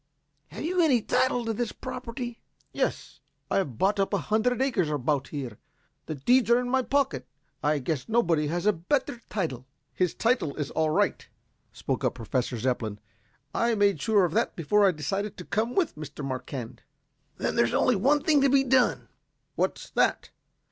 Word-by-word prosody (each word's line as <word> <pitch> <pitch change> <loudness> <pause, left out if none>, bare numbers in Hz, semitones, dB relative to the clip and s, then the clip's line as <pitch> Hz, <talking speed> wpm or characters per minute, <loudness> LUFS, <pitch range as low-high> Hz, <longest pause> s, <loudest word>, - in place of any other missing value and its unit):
Have - - -8
you 355 +3 +1
any 285 -7 +4
title 245 -2 +1
to 225 - -1
this 235 +1 -2
property?" 245 -1 -6 0.3
"Yes. - - -2 0.3
I - - +2
have 140 - -1
bought 200 +2 +2
up 195 - +1
a - - -5
hundred 245 +3 +2
acres 235 - +1
about 145 -1 0
here. 130 -8 -6 0.5
The 155 - -3
deeds 240 - +3
are 235 +1 +6
in 250 0 -3
my 265 0 +3
pocket. 250 - 0 0.3
I 150 +1 +2
guess 145 - -3
nobody 170 -10 +2
has 175 +5 -2
a 210 - +5
better 240 - -1
title.". 135 - -3 0.3
"His 180 -3 0
title 225 - +1
is 145 -3 -4
all 160 -1 +1
right," 155 - 0 0.4
spoke - - -3
up - - +1
Professor 125 +2 -2
Zepplin. 115 -3 -1 0.6
"I 235 0 +1
made 200 -7 +2
sure 210 -4 +3
of 165 - -3
that - - +1
before 200 +5 +3
I - - +4
decided 195 +7 -3
to 180 - -8
come 225 +4 -1
with 365 -5 +1
Mr. 150 -1 -7
Marquand." 130 -2 -5 0.6
"Then - - -1
there's 115 - +2
only 250 - +3
one 275 +9 +2
thing 300 -3 +4
to 275 - +4
be 270 0 +4
done." 260 -1 +2 0.5
"What's - - -2
that?" - - +1
195 Hz, 180 wpm, -27 LUFS, 145-245 Hz, 0.6 s, are